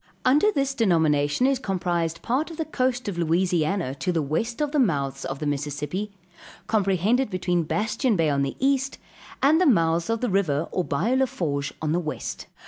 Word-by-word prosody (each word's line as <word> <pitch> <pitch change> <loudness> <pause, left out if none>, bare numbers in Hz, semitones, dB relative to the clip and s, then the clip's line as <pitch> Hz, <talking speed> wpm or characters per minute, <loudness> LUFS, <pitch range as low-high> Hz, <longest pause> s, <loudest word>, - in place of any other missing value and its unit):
Under 295 +11 +4
this 275 -5 0
denomination 160 - +2
is 270 -1 +2
comprised 175 -6 -2
part 270 +7 0
of 330 - -9
the 320 - -2
coast 255 -4 -1
of 185 -4 -3
Louisiana 170 -2 +1
to 180 +6 -2
the 165 -3 0
west 220 - -2
of 295 -1 0
the 300 - +1
mouths 140 - 0
of 135 - -4
the 150 - -5
Mississippi, 150 +7 -3 0.6
comprehended 210 +4 +1
between 180 -2 0
Bastien 215 - 0
bay 165 -3 +2
on 140 -1 +1
the 140 -1 -2
east, 270 0 +1 0.5
and 310 +5 +5
the 365 - +4
mouths 165 - +2
of 230 -1 0
the 250 - 0
river 165 -5 +1
or 180 - 0
bayou 195 - 0
la 265 0 +3
Fourche 145 - -2
on 155 - 0
the 170 - +2
west. 155 -3 -5
185 Hz, 190 wpm, -25 LUFS, 155-255 Hz, 0.6 s, and